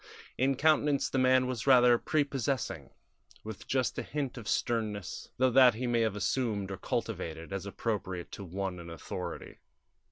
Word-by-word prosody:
In 135 +2 +2
countenance 150 -1 +2
the 135 - +1
man 130 0 +4
was 125 0 -4
rather 125 -2 +6
prepossessing, 135 - -1 0.5
with 110 -2 -8
just 130 -2 0
a - - 0
hint 140 -3 -3
of 115 -4 -8
sternness; 105 -6 -2
though 130 0 +3
that 125 -2 +7
he 125 +3 -3
may 120 -1 +2
have 110 -3 +1
assumed 105 -3 -1
or 95 - -4
cultivated, 80 +1 -4
as 100 0 -4
appropriate 100 -4 -3
to 100 - -7
one 95 0 -4
in 85 0 -9
authority. 85 -3 -7
115 Hz, 160 wpm, -30 LUFS, 100-130 Hz, 0.5 s, that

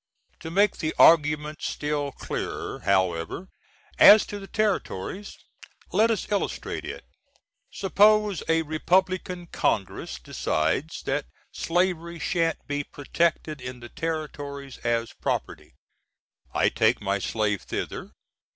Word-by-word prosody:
To 160 - -7
make 200 +5 +3
the 155 - -2
argument 150 -1 +5
still 145 -1 -2
clearer, - - -5
however, 95 - 0 0.5
as 210 +1 +9
to 205 - -6
the 195 - -9
Territories, 205 - -2 0.5
let 225 +2 +4
us 220 -2 -2
illustrate 205 - -2
it: - - -7 0.6
Suppose 210 0 +3
a 165 0 +3
Repub^n. 180 +2 0
Congress 100 -3 -1
decides 135 - -1
that 140 +2 -1 0.2
slavery 170 -1 -1
shan't 165 -1 -1
be 145 0 -2
protected 155 0 -1
in 125 0 -7
the 120 0 -10
Ter. 160 -2 -2 0.6
as 115 -1 0
prop. - - +1 1.1
I - - +3
take - - +2
my 100 0 -1
slave 105 0 -1
thither. - - -5
160 Hz, 115 wpm, -26 LUFS, 135-185 Hz, 1.1 s, as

